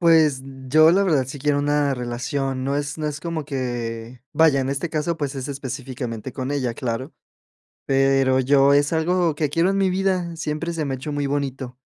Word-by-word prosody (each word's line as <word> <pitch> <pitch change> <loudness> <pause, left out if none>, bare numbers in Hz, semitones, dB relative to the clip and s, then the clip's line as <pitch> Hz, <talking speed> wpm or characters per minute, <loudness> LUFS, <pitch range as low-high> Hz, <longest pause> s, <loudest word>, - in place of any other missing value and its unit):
Pues, 160 -5 +4 0.3
yo 155 +3 +6
la 195 +3 +3
verdad 150 -8 +2
sí 135 +3 -7
quiero 145 +1 +1
una 145 -1 +1
relación, 130 +2 -3
no 140 +1 0
es 145 +1 -3
no 155 - -2
es 150 0 -4
como 165 -2 -3
que, 120 -3 -4
vaya, 160 -4 +4
en 130 - -2
este 140 +4 -2
caso, 160 +2 -1
pues, 145 -3 -3
es 130 -1 -4
específicamente 130 -4 -5
con 130 0 -4
ella 130 -5 -1
claro. 130 +5 -4 0.7
Pero, 135 -1 +3
yo, 140 +1 +4
es 145 +1 +3
algo 165 0 +1
que 150 0 0
quiero 165 +6 +2
en 195 - 0
mi 195 - +3
vida, 185 -3 0
siempre 160 +2 -3
se 160 -2 -2
me 135 - -2
ha - - -3
hecho 145 +3 -5
muy 145 -1 -1
bonito, 135 -3 -3
140 Hz, 200 wpm, -22 LUFS, 130-155 Hz, 0.7 s, yo